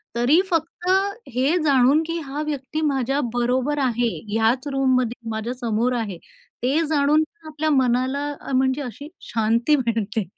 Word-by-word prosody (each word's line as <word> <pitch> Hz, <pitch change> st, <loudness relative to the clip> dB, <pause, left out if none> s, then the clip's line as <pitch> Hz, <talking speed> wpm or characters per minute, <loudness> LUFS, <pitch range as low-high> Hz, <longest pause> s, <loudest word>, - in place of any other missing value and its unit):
तरी 255 Hz, +8 st, +4 dB
फक्त 340 Hz, +1 st, -2 dB, 0.5 s
हे 275 Hz, +8 st, +2 dB
जाणून 280 Hz, +1 st, +4 dB
की 335 Hz, 0 st, -2 dB
हा 280 Hz, +2 st, -4 dB
व्यक्ती 295 Hz, +1 st, -3 dB
माझ्या 275 Hz, -2 st, 0 dB
बरोबर 250 Hz, +4 st, 0 dB
आहे, 240 Hz, -2 st, +1 dB, 0.2 s
ह्याच 230 Hz, +5 st, +1 dB
रूममध्ये 255 Hz, -3 st, 0 dB
माझ्या 220 Hz, +3 st, -3 dB
समोर 240 Hz, 0 st, 0 dB
आहे, 215 Hz, -7 st, -3 dB, 0.5 s
ते 275 Hz, +6 st, +2 dB
जाणून 300 Hz, +1 st, +3 dB
पण 320 Hz, 0 st, -15 dB
आपल्या 310 Hz, 0 st, -2 dB
मनाला 260 Hz, +1 st, +1 dB
अ, -, -, -7 dB
म्हणजे 260 Hz, +2 st, +1 dB
अशी 275 Hz, +3 st, -7 dB, 0.2 s
शांती 230 Hz, +6 st, +2 dB
मिळते. 225 Hz, -5 st, -1 dB
260 Hz, 145 wpm, -22 LUFS, 240-295 Hz, 0.5 s, तरी